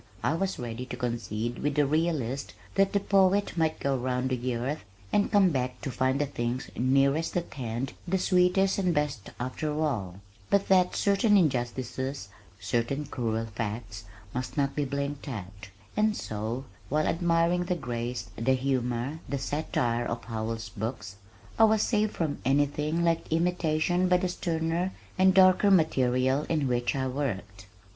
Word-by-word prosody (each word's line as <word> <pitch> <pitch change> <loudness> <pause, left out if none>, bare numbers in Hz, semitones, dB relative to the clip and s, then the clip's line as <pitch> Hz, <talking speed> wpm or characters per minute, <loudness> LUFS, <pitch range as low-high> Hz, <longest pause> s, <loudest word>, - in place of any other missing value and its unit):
I - - +2
was 190 +3 -1
ready 120 +1 -5
to - - -6
concede 115 -1 -3
with 145 -1 -1
the 150 - +4
realist 140 -4 -1 0.2
that 195 0 +3
the 200 - +2
poet 195 0 +3
might 160 -2 +1
go 140 -1 0
round 125 0 -1
the 125 0 -1
earth 130 +5 -3 0.3
and 205 - +2
come 195 -3 +5
back 125 -2 -2
to 135 - -3
find 130 +2 +1
the 145 - +2
things 125 -2 -3
nearest 140 +6 +2
at 175 - -4
hand 125 0 -4
the 190 +2 +1
sweetest 185 +1 +3
and 180 -3 +1
best 145 -8 -1
after 130 +5 -3
all, 105 - -1 0.3
but 200 0 +2
that 185 -1 +4
certain 205 +1 +4
injustices, 130 - -1 0.3
certain 120 +7 -1
cruel 115 -4 -2
facts 110 -1 -5 0.3
must 125 +2 -4
not 140 -1 +1
be 145 - 0
blinked 140 +1 -3
at, 100 -5 -7 0.3
and 215 0 +2
so, 110 +5 -4 0.2
while 155 +2 +1
admiring 170 +1 +2
the 180 - 0
grace, 120 - -4
the 130 +4 +2
humor, 130 +2 -1
the 140 - -1
satire 125 -4 -1
of 115 0 -4
Howells' 115 -1 -4
books, 105 -2 -5 0.4
I 225 - +9
was 220 -1 +3
saved 215 -2 +1
from 155 -4 -1
anything 145 +4 +1
like 165 -1 0
imitation 175 +1 +1
by 180 - +5
the 180 0 -1
sterner 170 +1 -1 0.3
and 190 0 +6
darker 190 +1 +6
material 130 -5 +3
in 155 -4 +1
which 120 0 0
I 135 -1 0
worked. 105 -7 -4
140 Hz, 160 wpm, -28 LUFS, 120-170 Hz, 0.4 s, I